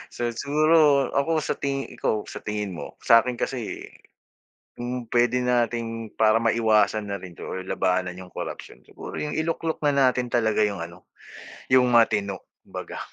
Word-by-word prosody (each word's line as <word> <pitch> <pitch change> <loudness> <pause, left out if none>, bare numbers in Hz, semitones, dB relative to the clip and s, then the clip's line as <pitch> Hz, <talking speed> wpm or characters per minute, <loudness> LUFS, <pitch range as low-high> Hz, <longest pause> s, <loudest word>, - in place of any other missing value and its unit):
So 120 -1 -1
siguro 145 +2 +3
ako 155 +3 +1
sa - - -1
tingi 135 -1 -2
ikaw, 105 -1 0
sa - - -7
tingin 105 -2 -3
mo? - - -8
Sa'kin 120 +1 +4
kasi, 125 -5 -4 0.9
kung 120 -1 -5
puwede 120 +1 +2
nating 115 -2 -1
para 110 0 +4
maiwasan 110 -2 +2
na 100 -2 -4
rin 90 -2 -10
'to - - -9
or 95 - -5
labanan 90 -1 -1
yung 90 -1 -11
corruption, - - -7
siguro - - -9
yung 150 - -3
iluklok 160 0 -2
na 145 - +4 0.2
natin 125 0 -3
talaga 110 -2 +2
yung 100 -4 -2
ano, 85 +2 -9 0.6
yung 130 -1 +5
matino 105 -4 +2 0.2
kumbaga. - - -7
115 Hz, 155 wpm, -25 LUFS, 105-130 Hz, 0.9 s, yung